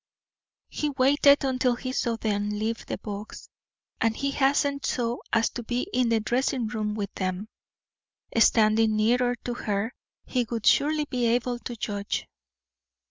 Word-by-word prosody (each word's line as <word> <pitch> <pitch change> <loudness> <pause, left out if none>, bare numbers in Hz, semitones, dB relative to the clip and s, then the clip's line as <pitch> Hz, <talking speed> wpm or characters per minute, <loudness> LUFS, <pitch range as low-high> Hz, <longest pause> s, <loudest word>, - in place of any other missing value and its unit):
He 300 - -2
waited 280 +1 +4
until 255 -2 +1
he 255 +1 -5
saw 235 -3 0
them 210 -2 -1
leave 215 +2 -3
the - - -3
box, 205 0 -8 0.5
and 225 0 +1
he 275 0 -1
hastened 280 0 +1
so 240 -1 -1
as 230 0 +2
to 245 - -5
be 245 +6 -2
in 250 -2 +2
the 230 -1 +3
dressing 245 +2 0
room 210 -1 -2
with 200 -2 -4
them. 185 +2 -3 0.9
Standing 220 -1 +4
nearer 245 +3 +2
to 245 - -2
her, 215 0 -2 0.3
he 250 -3 -1
would 230 -3 -3
surely 300 +1 +3
be 250 -4 -1
able 240 +1 0
to 240 - -6
judge. 205 -2 -3
235 Hz, 150 wpm, -26 LUFS, 215-255 Hz, 0.9 s, waited